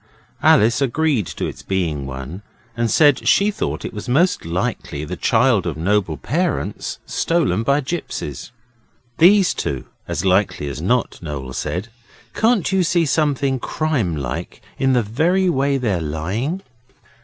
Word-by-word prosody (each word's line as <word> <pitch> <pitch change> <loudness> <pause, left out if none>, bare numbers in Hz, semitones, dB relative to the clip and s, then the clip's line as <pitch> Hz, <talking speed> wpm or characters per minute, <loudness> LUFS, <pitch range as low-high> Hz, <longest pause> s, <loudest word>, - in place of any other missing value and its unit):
Alice 115 +5 +4
agreed 135 - +1
to - - -4
its - - -6
being 80 -8 -2
one, 65 +8 -7 0.3
and 120 0 0
said 145 +2 +4
she 205 +1 +4
thought - - -3
it - - -5
was 105 +3 -6
most 165 - +2
likely 85 -4 -3
the 90 - -5
child 110 -1 +2
of 80 -3 -3
noble 90 -1 0
parents 150 - -2
stolen 165 -9 +1
by 140 +5 +2
gipsies. 165 -1 -5 0.7
'These 190 +2 +6
two, 65 -3 -3 0.2
as 85 - -2
likely 95 -5 +2
as 70 +1 -5
not,' 120 +7 0
Noel 70 -5 -6
said. 95 - -3 0.4
'Can't 220 -5 +2
you 190 -1 +3
see 170 0 +2
something 140 -3 +1
crime 125 - -1
like 70 -4 -5 0.2
in 135 -1 +3
the 125 -2 +3
very 175 - +2
way 140 -1 +1
they're 105 -9 -1
lying? 100 - -3
120 Hz, 145 wpm, -20 LUFS, -, 0.7 s, These